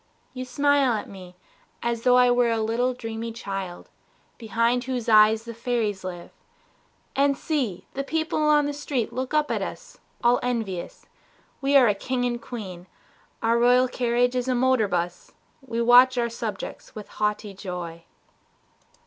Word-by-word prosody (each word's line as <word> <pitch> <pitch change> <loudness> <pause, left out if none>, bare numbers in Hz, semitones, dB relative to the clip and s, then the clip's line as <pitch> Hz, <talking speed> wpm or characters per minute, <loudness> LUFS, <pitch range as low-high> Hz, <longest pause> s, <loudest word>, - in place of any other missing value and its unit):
You 255 0 -5
smile 280 0 +2
at 215 - -3
me 180 -2 -12 0.5
As 235 -1 -1
though 250 +1 +4
I 250 0 +5
were 245 -1 +3
a 225 -1 0
little 235 +3 0
dreamy 225 -1 -5
child 195 -5 -6 0.5
Behind 230 +2 0
whose 255 -3 -3
eyes 215 0 +5
the 235 0 -8
fairies 230 -4 -2
live.... 175 -2 -7 0.8
And 280 0 +2
see, 260 - -2
The 275 - -3
people 315 +2 -1
on 300 -1 +4
the 290 - -2
street 280 -5 -3
look 260 +3 -3
up 300 -1 +2
at - - -1
us - - -7 0.2
All 240 +1 +4
envious. 225 -8 -4 0.6
We 280 +1 +1
are 255 -3 +6
a 210 - +3
king 245 +5 -2
and 240 -1 -2
queen, 190 -8 -8 0.6
Our 230 +1 +3
royal 250 +1 +5
carriage 245 0 0
is 250 0 -1
a 255 - +1
motor 255 -3 +2
bus, 175 -1 -3 0.3
We 235 -3 -2
watch 250 +2 +6
our 235 -1 +1
subjects 225 -3 -6
with 210 -1 -8
a - - -21
haughty 210 -1 -1
joy. 175 -4 -7
235 Hz, 165 wpm, -25 LUFS, 215-255 Hz, 0.8 s, are